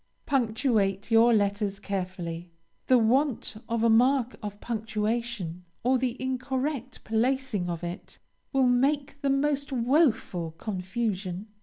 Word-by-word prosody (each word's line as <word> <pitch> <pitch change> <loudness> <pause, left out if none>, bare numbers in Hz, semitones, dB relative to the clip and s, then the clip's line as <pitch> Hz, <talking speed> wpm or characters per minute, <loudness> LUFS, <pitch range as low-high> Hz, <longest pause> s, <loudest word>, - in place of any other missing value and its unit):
Punctuate 225 -6 +1
your 225 +1 +6
letters 200 -2 +1
carefully. 180 -4 -4 0.4
The 255 - +6
want 245 0 +1
of 230 -1 0
a 230 - +5
mark 250 +2 +3
of 205 -1 -6
punctuation, 220 -5 -3 0.2
or 255 +1 +3
the 250 -1 -2
incorrect 260 0 -3
placing 225 -4 0
of 170 0 -4
it, 175 +3 -7 0.3
will 270 -2 +3
make 275 +3 +1
the 280 - +1
most 280 +1 +1
woful 235 - +1
confusion. 190 +1 -3
230 Hz, 120 wpm, -27 LUFS, 200-260 Hz, 0.4 s, your